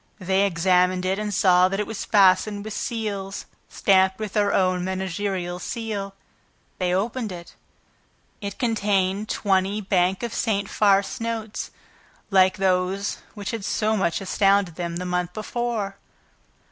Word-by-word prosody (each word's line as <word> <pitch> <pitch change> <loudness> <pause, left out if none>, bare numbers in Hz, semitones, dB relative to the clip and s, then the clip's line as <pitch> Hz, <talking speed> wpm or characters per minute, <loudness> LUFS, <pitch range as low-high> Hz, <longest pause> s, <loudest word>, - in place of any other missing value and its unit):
They 190 0 +2
examined 180 +1 +2
it 190 +2 0
and 210 -1 -3
saw 180 -2 +4
that 195 +1 -2
it 210 - 0
was 220 +1 -5
fastened 200 +1 +3
with 215 - -5
seals 205 -5 -4 0.2
stamped 190 -1 +3
with 215 -2 -5
their 205 -2 +2
own 185 -1 +2
managerial 185 -1 -3
seal. 205 -2 -4 0.6
They 180 -1 0
opened 215 +4 -1
it. 170 -1 -9 0.9
It 200 -1 -5
contained 205 -3 0
twenty 195 0 +1
Bank 190 0 +1
of 235 - -3
St. 205 -3 0
Farce 200 -1 +2
notes 225 -2 -4 0.6
like 190 0 +4
those 190 +1 0 0.2
which 205 -2 -4
had 225 -3 -4
so 215 +2 0
much 190 -2 0
astounded 195 -1 +2
them 170 0 -4
the 180 +1 -4
month 180 -1 -2
before. 215 -2 -3
195 Hz, 140 wpm, -24 LUFS, 185-210 Hz, 0.9 s, saw